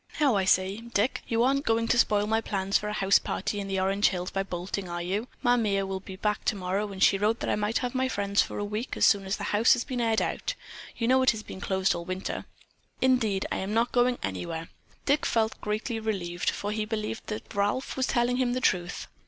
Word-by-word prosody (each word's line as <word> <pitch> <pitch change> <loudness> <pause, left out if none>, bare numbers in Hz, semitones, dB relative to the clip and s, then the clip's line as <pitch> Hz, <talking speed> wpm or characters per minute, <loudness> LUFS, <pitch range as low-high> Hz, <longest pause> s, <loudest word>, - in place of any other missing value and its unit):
Now 280 -7 +4
I 195 -1 +2
say, 190 +1 +2
Dick, 230 0 -1
you 230 0 +2
aren't 275 +2 +2
going 230 -2 +1
to 235 - +3
spoil 210 -4 +3
my 220 +1 +1
plans 195 -3 -2
for 210 - +2
a - - -3
house 195 -1 +4
party 205 - -3
in 200 - -4
the 195 -1 -1
Orange 195 +2 +3
Hills 180 0 -2
by 195 - 0
bolting, 185 0 -4
are 175 0 -3
you? 200 +7 -2 0.2
Ma 245 0 +4
Mere 200 -4 +1
will 190 0 -3
be 190 0 -9
back 210 +2 -1
tomorrow, 200 +1 -1
and 190 -1 -1
she 195 - +5
wrote 215 +3 +1
that - - -1
I - - +2
might 210 +2 0
have 245 - -3
my 260 0 0
friends 200 -3 +1
for - - -4
a 205 - -2
week 215 +4 -4
as - - +4
soon 200 -2 +4
as 190 +2 -1
the 205 - -6
house 220 +5 +6
has 245 -2 0
been 255 -3 -3
aired 225 -1 +2
out. - - -2 0.4
You 230 - 0
know 260 +1 +5
it 260 - +5
has 215 -2 0
been 190 - -9
closed 190 -1 +1
all 170 - -4
winter." 185 +2 -4 0.5
"Indeed, 235 -7 +2
I'm 200 +3 -2
not 230 +1 +2
going 245 0 +3
anywhere." 95 - -4 0.4
Dick 285 +1 +2
felt 220 -1 0
greatly 215 +2 -2
relieved, 180 -6 -2
for 205 - -3
he 215 0 -1
believed 215 0 -4
that 215 - -6
Ralph 205 +6 -1
was 260 -1 0
telling 245 0 +1
him 250 -1 +1
the 255 - 0
truth. 180 -7 0
210 Hz, 240 wpm, -28 LUFS, 195-235 Hz, 0.5 s, house